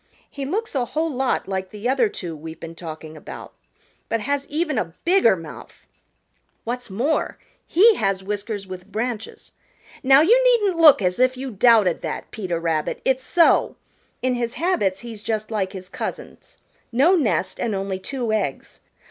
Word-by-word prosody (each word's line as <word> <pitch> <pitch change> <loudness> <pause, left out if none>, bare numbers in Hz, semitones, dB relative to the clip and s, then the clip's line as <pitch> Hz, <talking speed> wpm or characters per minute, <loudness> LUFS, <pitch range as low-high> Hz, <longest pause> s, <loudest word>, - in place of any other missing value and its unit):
He 280 -2 -6
looks 425 +10 -2
a 265 -3 +1
whole 315 +6 -2
lot 265 -1 -1
like 190 -1 -3
the 210 +3 -5
other 255 -4 +2
two 170 -5 -6
we've 160 +1 -9
been 165 0 -8
talking 160 -2 -9
about, - - -10 0.6
but 230 -1 0
has 280 +4 -2
even 305 -4 -1
a 165 -4 -4
bigger 345 - +5
mouth. 165 -3 -11 0.8
What's 245 +1 -4
more, 245 +11 -1 0.3
he 440 +6 +6
has 195 -1 0
whiskers 205 0 -4
with 185 +1 -10
branches. 225 0 -4 0.5
Now 270 +2 +6
you 470 +10 +5
needn't 420 -8 +3
look 300 -10 +8
as 180 +2 0
if 255 0 +3
you 265 0 -5
doubted 210 -4 +4
that, - - -5
Peter 180 -6 -3
Rabbit; 165 -2 -1
it's 260 0 +1
so. 340 +3 +3 0.5
In 255 0 +2
his 240 0 -2
habits 210 - 0
he's 230 -3 -8
just 215 0 -3
like 195 -3 -1
his 185 -1 -8
cousins, - - -7 0.3
no 275 +10 +4
nest 280 -11 0
and 220 -4 -1
only 195 -1 -3
two 240 +1 -3
eggs. 195 -11 -3
225 Hz, 165 wpm, -22 LUFS, 190-275 Hz, 0.8 s, look